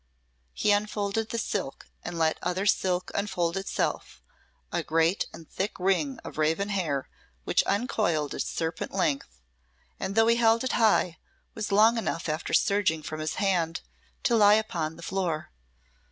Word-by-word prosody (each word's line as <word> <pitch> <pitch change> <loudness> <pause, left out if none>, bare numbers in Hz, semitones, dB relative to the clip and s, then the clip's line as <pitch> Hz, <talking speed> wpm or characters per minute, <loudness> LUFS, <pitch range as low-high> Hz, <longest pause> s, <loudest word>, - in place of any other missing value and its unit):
He 210 - +2
unfolded 205 +1 0
the 230 - -3
silk, 200 -10 -3 0.2
and 175 - -5
let 160 -1 +1
other 180 +2 -1
silk 185 -2 +1
unfold 175 -4 -1
itself, 195 - -2 0.5
a - - 0
great 165 +4 +1
and 160 - -12
thick 195 +2 -4
ring 195 +9 +1
of - - -8
raven 165 +6 +1
hair 160 -9 -1 0.4
which - - +3
uncoiled 200 - 0
its - - -2
serpent 160 0 -3
length, 140 - -1 0.6
and 195 - -3
though 225 0 +5
he 230 +1 +4
held 230 0 +4
it 260 - -1
high, 205 -7 +2 0.3
was 215 -1 -4
long 220 +3 +5
enough 170 -7 -3
after 155 +1 -3
surging 190 -6 +2
from 155 +1 -5
his 155 0 -2
hand 175 -5 0 0.4
to 235 - +3
lie 210 -1 +7
upon 170 -8 -1
the 170 - -12
floor. 175 -5 -2
190 Hz, 155 wpm, -27 LUFS, 165-210 Hz, 0.6 s, lie